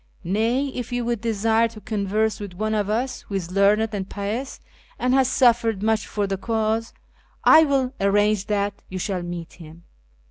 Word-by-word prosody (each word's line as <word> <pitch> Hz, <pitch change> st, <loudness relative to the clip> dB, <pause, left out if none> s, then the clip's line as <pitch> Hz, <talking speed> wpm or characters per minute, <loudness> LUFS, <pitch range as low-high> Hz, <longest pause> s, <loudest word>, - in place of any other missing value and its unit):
Nay, 230 Hz, +9 st, 0 dB
if 245 Hz, -3 st, -6 dB
you 245 Hz, -1 st, -1 dB
would 235 Hz, -3 st, -1 dB
desire 225 Hz, 0 st, +2 dB
to 225 Hz, -1 st, -12 dB
converse 215 Hz, +1 st, -1 dB
with 200 Hz, -4 st, -7 dB
one 215 Hz, +3 st, -1 dB
of 210 Hz, -2 st, 0 dB
us 245 Hz, +5 st, -1 dB
who 200 Hz, -, -5 dB
is 180 Hz, -2 st, -3 dB
learned 200 Hz, +3 st, +3 dB
and 195 Hz, -2 st, -4 dB
pious 215 Hz, +7 st, -4 dB, 0.4 s
and 250 Hz, +1 st, +1 dB
has 265 Hz, -1 st, +4 dB
suffered 230 Hz, -6 st, +3 dB
much 220 Hz, 0 st, +1 dB
for 205 Hz, -1 st, -1 dB
the 195 Hz, 0 st, -2 dB
cause, 225 Hz, +1 st, -1 dB, 0.5 s
1 315 Hz, -2 st, +7 dB
will 265 Hz, -2 st, +1 dB
arrange 205 Hz, 0 st, +2 dB
that 205 Hz, -1 st, -1 dB
you 185 Hz, -, -5 dB
shall 185 Hz, 0 st, -2 dB
meet 175 Hz, -1 st, -6 dB
him. 165 Hz, 0 st, -13 dB
215 Hz, 180 wpm, -23 LUFS, 200-230 Hz, 0.5 s, 1